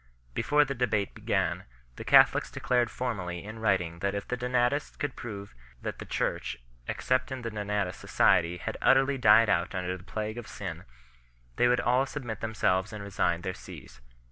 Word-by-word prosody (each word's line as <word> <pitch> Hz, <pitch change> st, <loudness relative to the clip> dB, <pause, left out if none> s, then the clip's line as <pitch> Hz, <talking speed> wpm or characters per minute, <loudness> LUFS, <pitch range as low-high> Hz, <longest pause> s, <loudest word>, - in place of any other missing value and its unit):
Before 150 Hz, -, +3 dB
the 140 Hz, -, -3 dB
debate 110 Hz, -6 st, 0 dB
began, -, -, -1 dB, 0.3 s
the -, -, -7 dB
Catholics -, -, +5 dB
declared 125 Hz, -1 st, +1 dB
formally 90 Hz, -9 st, -4 dB
in 110 Hz, +2 st, -8 dB
writing 90 Hz, -6 st, 0 dB
that 100 Hz, +2 st, -1 dB
if 100 Hz, -, -4 dB
the 125 Hz, -, -1 dB
Donatist 125 Hz, +3 st, 0 dB
could 145 Hz, -3 st, -3 dB
prove 100 Hz, -4 st, -7 dB, 0.3 s
that -, -, -4 dB
the -, -, -6 dB
Church, -, -, -2 dB, 0.3 s
except 130 Hz, +1 st, 0 dB
in 130 Hz, -2 st, -5 dB
the 115 Hz, -, -3 dB
Donatist 105 Hz, -3 st, -2 dB
society, 85 Hz, +1 st, +3 dB
had -, -, -5 dB
utterly 135 Hz, +1 st, +4 dB
died 110 Hz, -1 st, +7 dB
out 85 Hz, -1 st, +1 dB
under 90 Hz, 0 st, -2 dB
the 90 Hz, -, -11 dB
plague 110 Hz, +4 st, -4 dB
of 120 Hz, -, -9 dB
sin, -, -, -6 dB, 0.7 s
they 120 Hz, -, +4 dB
would 125 Hz, 0 st, +3 dB
all 125 Hz, +3 st, +2 dB
submit 125 Hz, -6 st, -5 dB
them 110 Hz, 0 st, -4 dB
selves 95 Hz, 0 st, +1 dB
and 105 Hz, -2 st, -6 dB
resign 90 Hz, -4 st, 0 dB
their 95 Hz, 0 st, -3 dB
sees. 65 Hz, -7 st, -12 dB
110 Hz, 180 wpm, -29 LUFS, 95-125 Hz, 0.7 s, died